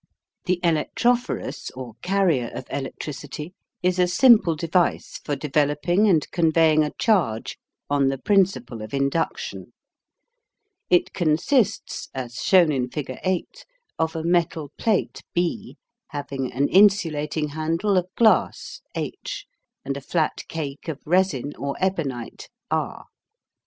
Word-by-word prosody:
The 180 0 +1
Electrophorus, 235 +9 0
or 125 -3 -7
carrier 180 -10 +1
of 130 - -6
electricity, 145 +3 -6 0.3
is 180 0 +1
a 180 - +4
simple 200 -4 +5
device 170 +3 0
for 145 - -1
developing 150 +7 +1
and 160 -6 +3
conveying 160 -2 +4
a 150 - -1
charge 160 - +1 0.3
on 140 -1 +2
the 135 0 0
principle 130 - +1
of 110 +4 -6
induction. 140 +4 -2 1.2
It 180 - +3
consists, 190 - +1
as 120 -3 -5
shown 180 -5 +4
in 125 -3 -1
figure 130 -2 -5
8, 185 -2 -2 0.4
of 160 0 0
a 160 - -3
metal 165 -3 0
plate 220 -4 0
B 180 +6 -2 0.3
having 140 -3 -4
an 140 +3 +1
insulating 160 -7 +3
handle 165 +7 0
of 180 -1 +2
glass 225 -2 +2
H, - - -5 0.4
and 140 0 -2
a 140 - -6
flat 155 +3 -1
cake 145 -1 -6
of 155 -3 -4
resin 160 -5 +1
or 140 0 -3
ebonite 150 -11 -3 0.2
R. - - -2
160 Hz, 125 wpm, -24 LUFS, 140-185 Hz, 1.2 s, simple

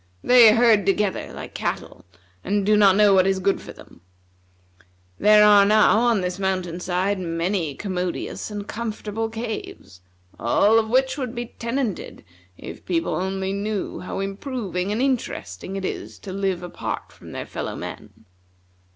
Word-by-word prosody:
They 235 -3 +7
herd 230 -4 +4
together 200 0 0
like - - -9
cattle, - - -4 0.4
and 200 0 0
do 210 +1 +4
not 200 -2 +6
know 205 -1 +5
what 190 0 +4
is 195 0 +2
good 195 +1 0
for - - -10
them. - - -16 1.2
There 210 0 +6
are 205 -1 +7
now 215 +1 +5
on 235 -4 +2
this 180 +1 -3
mountain 185 -3 -2
side 185 +2 -1
many 165 -2 -2
commodious 180 +1 -4
and 205 -1 -6
comfortable 225 -1 -4
caves, 220 - -7 0.4
all 205 - +4
of 220 -1 -2
which 260 +3 +1
would 255 -2 -4
be 240 0 -6
tenanted 260 - -3 0.3
if - - -10
people 335 -1 -1
only 190 +1 -2
knew 205 0 -3
how 185 - -5
improving 195 -2 -3
and 225 +5 0
interesting 195 - -3
it 195 -1 -3
is - - -5
to 190 - -8
live 190 -2 -2
apart 175 - -5
from - - -14
their - - -5
fellow - - -5
men. - - -9
205 Hz, 155 wpm, -23 LUFS, 190-225 Hz, 1.2 s, They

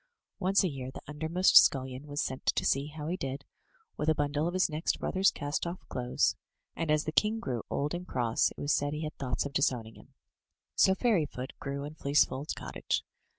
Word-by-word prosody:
Once 195 +3 +3
a - - +3
year 135 -5 -5
the - - -10
undermost 160 +5 +1
scullion 130 +1 +5
was 145 0 -4
sent 130 0 -4
to - - +2
see 140 +2 +2
how 150 0 -7
he 170 +4 -1
did, 135 -4 -5 0.5
with 155 - 0
a 155 - +4
bundle 145 +2 0
of 175 - -3
his 185 - +3
next 155 +1 -1
brother^s 190 +1 +2
cast 145 +4 -3
off 175 +2 -7
clothes; 125 -1 +1 0.4
and, 165 -1 -3
as 150 0 +3
the 155 - -3
king 215 +7 +2
grew 125 - -3
old 145 +3 -1
and 175 +1 -5
cross, 120 -6 +1
it - - -15
was 145 +1 +1
said 145 0 0
he 150 +1 -4
had 155 - -5
thoughts 125 -2 -1
of 140 - -5
disowning 120 -5 0
him. - - -18 0.6
So 190 - +4
Fairyfoot 160 - 0
grew 140 +1 -4
in 145 +1 -6
Fleecefold's 140 -1 +1
cottage. - - -3
150 Hz, 205 wpm, -30 LUFS, 135-165 Hz, 0.6 s, scullion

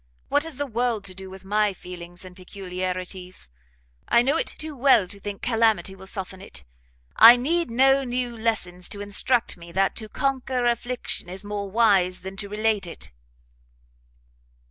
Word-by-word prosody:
what 290 +2 +2
has 325 -5 -6
the 285 - -1
world 235 -3 -1
to 185 - -6
do 190 0 -8
with 190 0 -12
my 210 0 +2
feelings 175 0 -10
and 180 -1 -12
peculiarities? 185 - -5 0.6
I 235 - +5
know 275 +4 +2
it - - +1
too 310 -1 -5
well 250 -7 +4
to 200 - -8
think 200 0 -7
calamity 220 -6 +2
will 190 0 -12
soften 190 -1 -5
it; 65 - -9 0.5
I 230 +2 +11
need 325 +6 0
no 270 +3 +4
new 245 -1 -2
lessons 190 -6 -2
to 205 - -6
instruct 215 +4 +1
me 170 0 -12
that 195 +1 +1
to 220 -2 -5
conquer 260 -2 -1
affliction 240 -5 -1
is 190 +3 -6
more 205 -1 -4
wise 195 -4 +3
than 190 +1 -7
to 200 0 -4
relate 210 -2 0
it." 170 - -8
205 Hz, 165 wpm, -24 LUFS, 185-245 Hz, 0.6 s, I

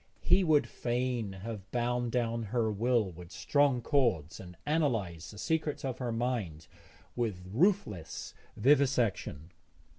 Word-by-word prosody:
He 195 - +5
would 155 -4 +4
fain 120 -3 -2
have 105 -4 -6
bound 120 0 0
down 115 -1 0
her 110 0 0
will 110 -1 +1
with 85 +1 -12
strong 140 -1 +2
cords 115 - +1
and 90 -2 -11
analysed 115 - 0
the 105 - -11
secrets 155 +4 -1
of 130 -1 -3
her 125 -2 -2
mind 115 -9 -2 0.5
with 110 -7 -2
ruthless 120 - 0 0.2
vivisection. 120 - +2
120 Hz, 125 wpm, -31 LUFS, 100-130 Hz, 0.5 s, He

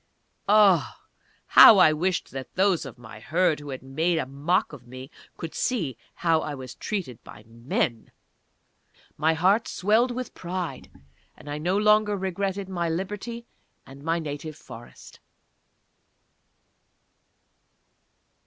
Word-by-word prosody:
_ - - -45 0.5
Ah! 205 -4 +4 0.5
how 220 - +9
I 170 -5 +6
wished 180 +3 -2
that 135 0 -8
those 185 -6 +1
of 130 - -11
my 110 -2 -12
Herd 165 +5 +1
who 145 -1 -10
had 130 -1 -7
made 160 +6 0
a 160 - -1
mock 150 +9 -1
of 125 -4 -12
me 130 +3 -10 0.3
could 165 -2 -7
see 170 - -2 0.2
how 165 -2 +2
I 150 -2 -5
was 130 -2 -9
treated 185 - -5
by 105 - -13
Men! 115 0 -3 1.0
My 160 +1 +1
heart 195 +7 +2
swelled 220 +6 +2
with 250 0 -5
pride, 180 -1 -5 0.5
and - - -16
I 145 +1 -4
no 180 +5 0
longer 210 0 +3
regretted 190 +1 -3
my 175 -3 -2
liberty 210 +7 -5 0.4
and 135 +1 -13
my 165 +2 0
native 155 -1 -6
Forest. 120 -5 -13
165 Hz, 135 wpm, -25 LUFS, 140-195 Hz, 1.0 s, how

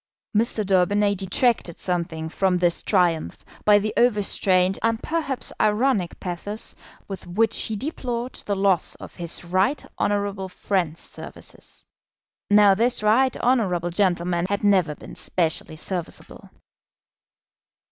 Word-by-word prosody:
Mr. 215 -1 +1
Daubeny 200 +2 +3
detracted 195 -1 0
something 170 -3 -2
from 185 +2 +1
this 175 -1 +2
triumph 175 -5 0 0.2
by 210 -1 +7
the 210 +1 -1
overstrained 195 -5 +2
and 230 0 0
perhaps 295 -6 -2
ironic 215 -3 +1
pathos 195 +4 -4 0.3
with 195 -2 -7
which 220 +5 +1
he 220 - -3
deplored 250 -1 -4
the 200 - +1
loss 195 -3 +1
of - - -11
his 170 0 -5
right 190 +11 +1
honourable 200 -1 -1
friend's 180 -4 -1
services. - - -10 0.6
Now 205 -1 +7
this 230 +2 +1
right 245 +5 +3
honourable 185 -9 +1
gentleman 175 -2 +1
had 200 0 -1
never 185 -7 +3
been - - -11
specially 160 -2 -2
serviceable. 175 +2 -6
195 Hz, 120 wpm, -24 LUFS, 180-215 Hz, 0.6 s, by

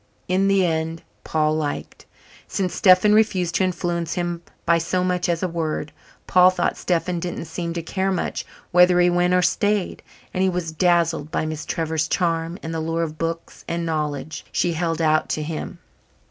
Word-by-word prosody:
In 190 +2 +2
the 195 -1 +3
end 160 0 -2 0.2
Paul 155 -1 +1
"liked," 150 -2 -4 0.4
since 185 -3 -2
Stephen 185 +3 +5
refused 190 -5 +2
to - - +2
influence 175 -2 -1
him 175 -1 -2 0.2
by 170 0 +4
so 180 +2 0
much 180 0 0
as 170 0 0
a - - +2
word. 160 -3 -3 0.3
Paul 180 0 +6
thought 185 - 0
Stephen 175 0 -1
didn't 175 -1 -4
seem 170 +1 -4
to 170 -1 -4
care 190 +3 -1
much 185 - -2 0.3
whether 180 0 +6
he 175 0 +4
went 175 +1 +2
or 180 - +3
stayed, 205 -1 0 0.3
and 185 - -1
he 190 - +3
was 175 -3 -2
dazzled 165 -2 +2
by 160 - -1
Miss 155 0 -5
Trevor's 160 -2 -1
charm 165 0 0
and 160 - -4
the 165 - -2
lure 165 +1 -1
of 155 -1 -5
books 165 0 -4
and 170 0 -2
knowledge 150 -2 -3
she 175 - +1
held 165 0 -1
out 155 0 +2
to 155 - -1
him. 155 +1 -5
170 Hz, 185 wpm, -22 LUFS, 160-180 Hz, 0.4 s, Paul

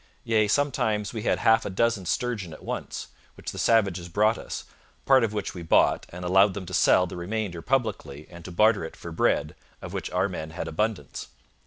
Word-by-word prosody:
Yea, 110 -2 +2
sometimes 110 -5 0
we 110 - -4
had - - +1
half 110 0 +4
a - - -4
dozen 100 -1 0
sturgeon 105 -9 -2
at - - -12
once, - - -5 0.3
which - - -6
the - - -7
savages 100 -6 +2
brought 105 +5 +3
us, - - -6 0.4
part 135 -2 +5
of 110 - 0
which 105 -1 -3
we 90 - -7
bought, 80 - +3
and 90 +1 -8
allowed 95 +2 +4
them 100 -2 -5
to 95 - -9
sell 90 +1 +4
the 85 - -8
remainder 90 -1 -3
publicly 100 - -2
and 85 -1 -11
to 90 - -8
barter 105 +2 +3
it 80 - -7
for 85 - -9
bread, 75 -1 +1 0.3
of - - -8
which - - -4
our 90 +2 +1
men 80 -5 -6
had 85 0 -5
abundance. 105 +6 -3
100 Hz, 205 wpm, -26 LUFS, 85-110 Hz, 0.4 s, part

